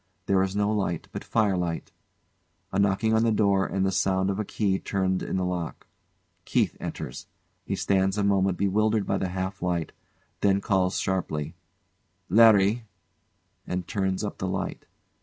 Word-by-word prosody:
There 95 0 +3
is 95 +1 -1
no 105 +1 +1
light 95 -6 -1
but - - -6
fire 105 -4 +1
light. 85 -2 -3 0.8
A - - 0
knocking 100 +3 +2
on 110 0 +3
the 115 - +3
door 100 -2 +2
and 95 0 0
the 95 - +1
sound 95 0 +1
of 95 - -3
a - - +1
key 100 -2 0
turned 95 -2 -1
in - - -2
the 90 - 0
lock. 90 -3 -4 0.6
KEITH - - +1
enters. 60 - -6 0.4
He - - -2
stands 95 0 +1
a 105 - +1
moment 95 -2 +2
bewildered 105 +2 +1
by - - 0
the 95 - -1
half 95 +1 -4
light, 85 -2 -1 0.5
then 100 -1 +3
calls 95 -2 +1
sharply: 80 -5 -2 0.8
"Larry!" 110 +2 +5 0.8
and 90 0 -3
turns 95 -1 -1
up 105 - -4
the 95 - -2
light. 95 - -4
95 Hz, 165 wpm, -26 LUFS, 95-100 Hz, 0.8 s, Larry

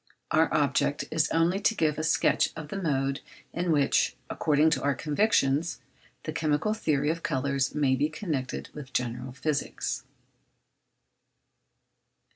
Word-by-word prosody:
Our 160 +1 +3
object 145 -1 +1
is 160 -1 +2
only 170 +4 +2
to 220 +2 +2
give 155 -4 +1
a - - -2
sketch 155 - +2
of 160 -2 -7
the 195 - -4
mode 135 -4 0 0.3
in 175 0 0
which, 145 -3 +2 0.2
according 155 +1 +3
to 135 -5 +1
our 140 -1 +1
conviction, 150 -4 +2 0.6
the 155 - -4
chemical 155 +5 +1
theory 150 -8 +1
of 165 +1 -4
colours 140 -3 -1
may 140 -3 +3
be 145 +3 +1
connected 150 -6 -4
with 135 -3 -9
general 125 +1 -2
physics. 140 +2 -2
150 Hz, 135 wpm, -28 LUFS, 140-160 Hz, 0.6 s, Our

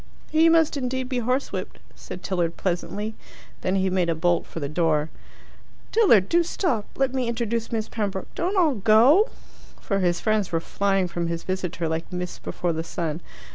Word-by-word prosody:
"He 320 +1 +5
must 325 -2 +3
indeed 260 -1 -2
be 255 -2 0
horsewhipped," 250 +3 -2 0.2
said 180 - -9
Tilliard 175 -3 -1
pleasantly. 200 +4 -2 0.5
Then 185 +1 0
he 190 0 +2
made 180 -2 +1
a 165 - +1
bolt 175 +1 +1
for - - -7
the 145 - -2
door. 155 0 +1 0.8
"Tilliard 235 - +5
do 345 - +4
stop 320 - -1
let 270 -1 +1
me 260 -2 0
introduce 235 -1 -2
Miss 220 -2 -1
Pembroke 200 -4 -4
don't 370 +4 -1
all 330 -6 +4
go!" 235 - +5 0.5
For 195 -2 -1
his 175 -2 +1
friends 215 -3 0
were 165 - +1
flying 195 +2 0
from 170 -1 -3
his 170 0 -3
visitor 180 -3 -2
like 160 +3 -3
mists 180 0 -4
before 175 -1 -2
the 160 +1 -3
sun. 165 -1 -3
195 Hz, 175 wpm, -24 LUFS, 175-250 Hz, 0.8 s, He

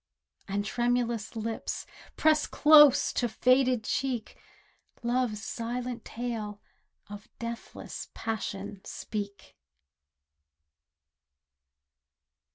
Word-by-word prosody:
And 200 +1 -1
tremulous 240 -1 0
lips, 225 0 -3 0.3
pressed 310 -1 +3
close 295 -3 +7
to 240 - 0
faded 255 0 +3
cheek 255 -1 -2 0.7
Love's 235 -3 0
silent 245 +2 -4
tale 220 -3 -4 0.5
of 205 +1 -10
deathless 235 0 -6
passion 205 -3 -4
speak. 200 -2 -6
235 Hz, 70 wpm, -29 LUFS, 210-250 Hz, 0.7 s, close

